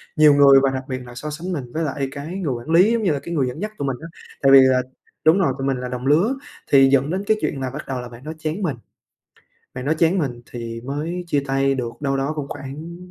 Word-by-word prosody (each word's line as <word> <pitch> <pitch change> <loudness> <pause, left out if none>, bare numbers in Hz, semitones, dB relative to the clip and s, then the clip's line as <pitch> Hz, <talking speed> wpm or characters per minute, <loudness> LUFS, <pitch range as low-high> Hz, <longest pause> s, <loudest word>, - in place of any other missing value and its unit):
nhiều 150 -1 +7
người 140 -1 +7
và 135 - +4
đặc 130 0 -3
biệt 130 -1 -3
là 120 0 -11
so 150 +4 -5
sánh 165 +5 -5
mình 125 -6 -5
với 165 - -1
lại 140 -2 -2
cái 140 +2 -7
người 150 -9 -1
quản 120 +5 -7
lý, 180 +7 +5
giống 230 -2 0
như 185 - +2
là, 145 - -1
cái 170 +5 -7
người 140 -6 +1
dẫn 125 - -6
dắt 215 +1 -3
tụi 140 - -3
mình 130 - -2
á, 165 - -7 0.3
tại 135 - +5
vì 135 - +10
là 130 -1 +4 0.4
đúng 160 +5 +6
rồi, 150 -9 +2
tụi 135 0 -2
mình 135 -1 0
là 125 0 -4
đồng 125 +1 -4
lứa, 175 - +3 0.4
thì 135 -1 +7
dẫn 135 +2 +3
đến 190 +3 -2
cái 215 - +3
chuyện 135 - -2
là 130 - -2
bắt 150 +4 -8
đầu 130 -2 -3
là 125 - -8
bạn 120 +1 -13
đó 155 - -5
chán 160 +5 -3
mình, 155 -9 -1 1.0
bạn 125 0 -5
đó 150 - +2
chán 170 +3 +3
mình 120 -6 -3
thì 115 -1 -6
mới 160 +6 -4
chia 145 -4 +1
tay 135 0 +1
được 125 -3 -3
đâu 135 -2 0
đó 135 +2 -1
cũng 145 -2 -3
khoảng 145 +5 -7
140 Hz, 280 wpm, -21 LUFS, 130-160 Hz, 1.0 s, vì